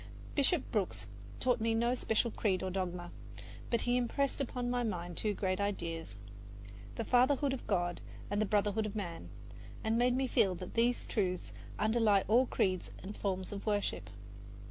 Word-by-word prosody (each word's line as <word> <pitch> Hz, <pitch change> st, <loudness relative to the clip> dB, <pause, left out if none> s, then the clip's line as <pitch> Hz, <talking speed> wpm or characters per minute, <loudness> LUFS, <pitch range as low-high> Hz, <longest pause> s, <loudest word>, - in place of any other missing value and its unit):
Bishop 285 Hz, +1 st, +2 dB
Brooks 205 Hz, -4 st, -1 dB, 0.3 s
taught 250 Hz, -3 st, +2 dB
me 225 Hz, 0 st, +2 dB
no 235 Hz, +2 st, +2 dB
special 235 Hz, -1 st, +1 dB
creed 190 Hz, -5 st, 0 dB
or 190 Hz, -, -2 dB
dogma; 180 Hz, -2 st, -3 dB, 0.6 s
but 235 Hz, -, +1 dB
he 245 Hz, 0 st, +2 dB
impressed 275 Hz, +3 st, 0 dB
upon 250 Hz, -2 st, -2 dB
my 245 Hz, 0 st, +1 dB
mind 175 Hz, -6 st, -3 dB
two 210 Hz, +2 st, 0 dB
great 185 Hz, -1 st, 0 dB
ideas 165 Hz, -, -3 dB, 0.8 s
the 230 Hz, -, -3 dB
fatherhood 265 Hz, +3 st, +3 dB
of 265 Hz, -, -6 dB
God 175 Hz, -3 st, 0 dB, 0.3 s
and 205 Hz, +1 st, 0 dB
the 215 Hz, -, +1 dB
brotherhood 210 Hz, +1 st, +1 dB
of 210 Hz, -, -7 dB
man, 175 Hz, -6 st, -5 dB, 0.5 s
and 220 Hz, +1 st, +2 dB
made 245 Hz, 0 st, +4 dB
me 265 Hz, +1 st, +1 dB
feel 195 Hz, -7 st, +3 dB
that 180 Hz, +1 st, -7 dB
these 235 Hz, +1 st, +2 dB
truths 185 Hz, -4 st, -1 dB, 0.2 s
underlie 215 Hz, -2 st, +3 dB
all 240 Hz, +5 st, +5 dB
creeds 185 Hz, -5 st, 0 dB
and 200 Hz, +2 st, -6 dB
forms 190 Hz, -2 st, -2 dB
of 200 Hz, +1 st, -6 dB
worship. 200 Hz, -, 0 dB
210 Hz, 165 wpm, -33 LUFS, 185-240 Hz, 0.8 s, all